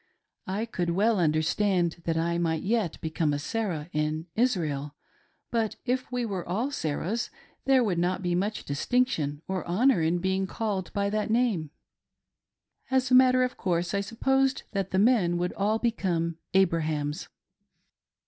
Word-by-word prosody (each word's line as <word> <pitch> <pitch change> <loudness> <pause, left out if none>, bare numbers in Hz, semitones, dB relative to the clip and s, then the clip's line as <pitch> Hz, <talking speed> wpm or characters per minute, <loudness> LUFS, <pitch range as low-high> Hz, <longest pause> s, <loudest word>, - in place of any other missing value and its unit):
I 200 +4 -1
could 180 -6 -2
well 205 +4 +2
understand 170 +2 +1
that 165 -1 0
I 170 +1 0
might 160 -2 0
yet 210 -5 0
become 160 -1 0
a - - 0
Sarah 165 -1 -3
in 155 +1 -1
Israel, 155 - 0 0.6
but 225 -2 0
if 255 +1 -1
we 250 -1 -1
all 220 - -5 0.3
were 285 - -3
Sarahs, 185 - -2 0.4
there 265 -2 +5
would 185 -6 0
not 180 +2 0
be 175 -1 0
much 200 +5 -1
distinction 150 - 0
or 190 -1 -2
honor 220 +3 +3
in 160 +2 +2
being 190 +1 0
called 200 -3 -3
by 200 -1 0
that 215 0 -1
name. 220 -9 +1 1.2
As 260 -1 +1
a - - +4
matter 255 0 +6
of 250 - -2
course 175 -1 -1
I 200 - +1
supposed 265 +5 +1
that 195 -2 -2
the 190 - -1
men 200 -5 +3
would 180 +1 -1
all 210 +2 +1
become 175 -8 -1 0.2
Abrahams. 160 -3 +1
190 Hz, 155 wpm, -27 LUFS, 165-230 Hz, 1.2 s, matter